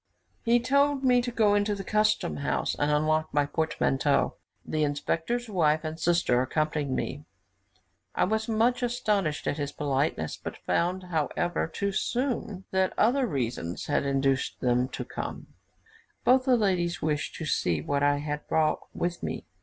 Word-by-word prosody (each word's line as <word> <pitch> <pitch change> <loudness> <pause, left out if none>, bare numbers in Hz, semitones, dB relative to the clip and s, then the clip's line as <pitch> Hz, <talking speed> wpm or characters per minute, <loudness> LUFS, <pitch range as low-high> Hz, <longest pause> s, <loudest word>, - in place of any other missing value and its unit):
He 235 +1 +3
told 280 +2 +2
me 250 -1 +4
to 245 - -3
go 215 -3 +3
into 205 0 +1
the 195 - -6
custom 215 - +1
house, 70 -1 -1
and 145 - 0
unlock 155 +1 +1
my 145 0 +2
portmanteau. 145 -2 +1 0.3
The 155 - -1
inspector's 165 +11 -1
wife 160 -6 +2
and 160 0 -5
sister 165 -7 +2
accompanied 150 +2 -1
me. 140 +2 -3 0.9
I - - +2
was 220 +3 0
much 230 +3 +2
astonished 210 -10 0
at - - -1
this 145 -1 -3
politeness, 140 - -1
but - - -7
found, 180 +2 0
however, 175 0 -1
too 200 +5 -2
soon 235 -3 -2
that 190 0 +1
other 250 +3 +3
reasons 120 - -3
had - - +1
induced 135 -1 0
them 125 0 +2
to - - -5
come - - -6 0.7
both 255 +1 +4
the 255 -2 +4
ladies 175 -6 0
wished 150 -1 -1
to 160 - -5
see 85 - +1
what 140 - -1
I 145 0 +3
had 150 0 -4
brought 155 -1 +2 0.2
with 175 0 -2
me. - - -4
160 Hz, 160 wpm, -28 LUFS, 145-215 Hz, 0.9 s, me